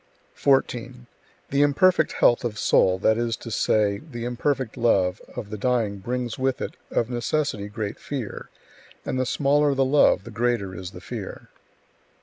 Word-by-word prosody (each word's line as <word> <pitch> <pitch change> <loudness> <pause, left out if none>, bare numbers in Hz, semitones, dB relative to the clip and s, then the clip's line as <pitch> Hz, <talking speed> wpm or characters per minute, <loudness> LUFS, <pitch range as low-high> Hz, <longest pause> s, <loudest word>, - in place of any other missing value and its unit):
14. 125 -2 0 0.5
The 140 +1 +2
imperfect 180 +6 +3
health 120 - +3
[of 115 -3 -3
soul], 95 -3 +3
that 110 +4 +2
is 115 -1 -1
to 115 - -9
say, 105 -2 +1
the 120 -7 -7
imperfect 125 0 -1
love, 100 -6 +2
of 105 - -6
the 105 - -5
dying 115 -4 0
brings 120 +3 -3
with 130 0 0
it, - - -5
of 120 +1 -1
necessity, 120 -3 -1
great 105 0 -5
fear; 130 -7 -6 0.6
and 130 - -2
the 130 - 0
smaller 145 +1 +2
the 135 0 +2
love, 145 +2 +4
the 115 - -10
greater 115 -4 -1
is 90 0 -6
the - - -11
fear. - - -7
120 Hz, 160 wpm, -24 LUFS, 105-135 Hz, 0.6 s, love